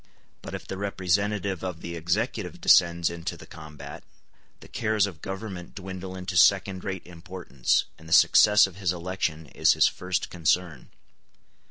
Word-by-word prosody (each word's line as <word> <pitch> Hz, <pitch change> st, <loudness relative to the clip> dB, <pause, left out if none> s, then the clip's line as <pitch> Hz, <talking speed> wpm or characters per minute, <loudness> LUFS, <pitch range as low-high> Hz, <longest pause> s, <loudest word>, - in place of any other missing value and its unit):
But -, -, -7 dB
if -, -, -8 dB
the 95 Hz, -, -6 dB
representative 100 Hz, -1 st, -1 dB
of 90 Hz, -3 st, -5 dB
the 85 Hz, 0 st, -6 dB
executive 90 Hz, +2 st, -2 dB
descends 85 Hz, -1 st, +4 dB
into 85 Hz, -1 st, -5 dB
the -, -, -13 dB
combat, 75 Hz, -1 st, -11 dB, 0.6 s
the -, -, -13 dB
cares 110 Hz, -2 st, 0 dB
of 90 Hz, -6 st, -8 dB
government 95 Hz, -2 st, -7 dB
dwindle 95 Hz, -1 st, -7 dB
into 90 Hz, 0 st, -6 dB
second 95 Hz, +1 st, +4 dB
rate 95 Hz, -2 st, -5 dB
importance, 85 Hz, -6 st, -2 dB
and 80 Hz, 0 st, -13 dB
the -, -, -11 dB
success 105 Hz, +5 st, +6 dB
of 95 Hz, -1 st, -9 dB
his 95 Hz, -3 st, 0 dB
election 85 Hz, -3 st, -3 dB
is -, -, +2 dB
his -, -, +4 dB
first 90 Hz, 0 st, -2 dB
concern. 85 Hz, -3 st, -1 dB
90 Hz, 155 wpm, -26 LUFS, 85-95 Hz, 0.6 s, success